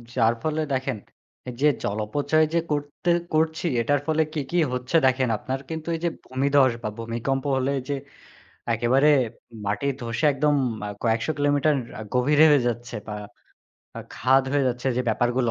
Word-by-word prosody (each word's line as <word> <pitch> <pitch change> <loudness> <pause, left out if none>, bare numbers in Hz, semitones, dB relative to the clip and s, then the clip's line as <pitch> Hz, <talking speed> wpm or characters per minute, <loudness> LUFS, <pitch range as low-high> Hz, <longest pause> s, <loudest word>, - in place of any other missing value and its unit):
যার 115 -2 +3
ফলে 155 0 0
দেখেন 130 -2 -1 0.6
যে 150 - +4 0.2
জল 100 - -2
অপচয় 145 +7 +2
যে 170 - +3
করতে 145 +4 -2 0.2
করছি 160 +2 +1 0.2
এটার 145 +4 +1
ফলে 160 0 +2
কি, 155 - -2
কি 175 - 0 0.2
হচ্ছে 125 +4 -3
দেখেন। 130 -1 +2
আপনার 130 +5 -4
কিন্তু 160 0 -5
এই 165 - -5
যে - - +3 0.2
ভূমিধ্বস 135 0 +3
বা - - -1
ভূমিকম্প 120 +4 -2
হলে 130 +1 0 0.2
যে 140 - 0 0.8
একেবারে 125 +5 +3 0.6
মাটি 105 +7 -1
ধসে 115 +2 -2
একদম 150 +2 +2 0.3
আ - - -4
কয়েকশো 115 +4 +1
কিলোমিটার 145 +1 +2 0.2
আ - - -5
গভীরে 145 +5 +5
হয়ে 145 -2 +5
যাচ্ছে 120 0 -4
বা 105 - -4 0.8
আ - - -4
খাদ 135 +2 +3
হয়ে 145 -1 +2
যাচ্ছে 125 +1 -4
যে 125 - +1
ব্যাপারগুলো, 120 +2 +1
135 Hz, 165 wpm, -24 LUFS, 120-145 Hz, 0.8 s, গভীরে